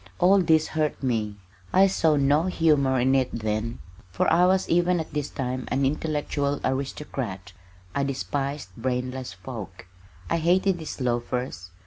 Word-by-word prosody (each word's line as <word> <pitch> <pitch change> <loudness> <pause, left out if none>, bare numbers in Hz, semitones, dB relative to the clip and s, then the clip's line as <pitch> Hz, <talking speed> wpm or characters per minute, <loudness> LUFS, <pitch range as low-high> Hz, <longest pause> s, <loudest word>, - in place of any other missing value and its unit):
All 190 +2 +5
this 160 -2 +3
hurt 155 -2 -1
me. 110 -5 -1 0.4
I 190 - +6
saw 165 -5 +3
no 145 +3 +3
humor 150 -7 +3
in 130 +2 +3
it 130 -2 +2
then, 110 +1 -2 0.3
for 90 - 0
I 175 +2 +5
was 190 0 +2
even 175 +1 +2
at 160 - -6
this 145 -1 -2
time 130 -1 -3
an 135 0 +1
intellectual 145 -1 -1
aristocrat. 130 -8 -3 0.4
I 140 - 0
despised 140 -1 -3
brainless 125 0 -3
folk. 100 -3 -8 0.4
I 170 - +1
hated 180 +3 +2
these 160 - -6
loafers. 120 -6 -2
140 Hz, 145 wpm, -25 LUFS, 125-160 Hz, 0.4 s, I